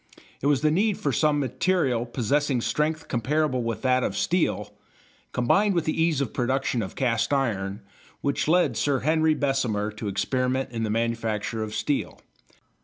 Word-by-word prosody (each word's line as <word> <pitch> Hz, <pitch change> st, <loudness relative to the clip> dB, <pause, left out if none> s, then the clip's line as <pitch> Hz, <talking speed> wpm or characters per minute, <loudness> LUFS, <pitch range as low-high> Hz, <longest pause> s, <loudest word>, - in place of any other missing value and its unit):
It 140 Hz, -, 0 dB
was 145 Hz, -3 st, +3 dB
the 155 Hz, 0 st, +3 dB
need 200 Hz, +5 st, +2 dB
for 140 Hz, -, -1 dB
some 150 Hz, +2 st, +2 dB
material 135 Hz, -3 st, 0 dB
possessing 130 Hz, +3 st, 0 dB
strength 155 Hz, +5 st, -1 dB
comparable 130 Hz, +2 st, 0 dB
with 115 Hz, +1 st, -3 dB
that 130 Hz, -1 st, +3 dB
of 100 Hz, -, -2 dB
steel 105 Hz, -, 0 dB, 0.6 s
combined 195 Hz, -, +2 dB
with 170 Hz, -, +1 dB
the 155 Hz, +1 st, 0 dB
ease 160 Hz, -4 st, +2 dB
of 130 Hz, -, -3 dB
production 130 Hz, -1 st, 0 dB
of 95 Hz, -, -6 dB
cast 115 Hz, -2 st, 0 dB
iron 105 Hz, -7 st, -1 dB, 0.4 s
which 140 Hz, +1 st, -1 dB
led 160 Hz, -6 st, +3 dB
Sir 135 Hz, +3 st, +1 dB
Henry 160 Hz, +1 st, +2 dB
Bessemer 125 Hz, -8 st, 0 dB
to 105 Hz, +1 st, -6 dB
experiment 125 Hz, +6 st, -1 dB
in 115 Hz, -2 st, -4 dB
the 110 Hz, -, -1 dB
manufacture 115 Hz, -1 st, -1 dB
of 110 Hz, -1 st, -4 dB
steel. 145 Hz, -2 st, -2 dB
130 Hz, 165 wpm, -25 LUFS, 115-150 Hz, 0.6 s, was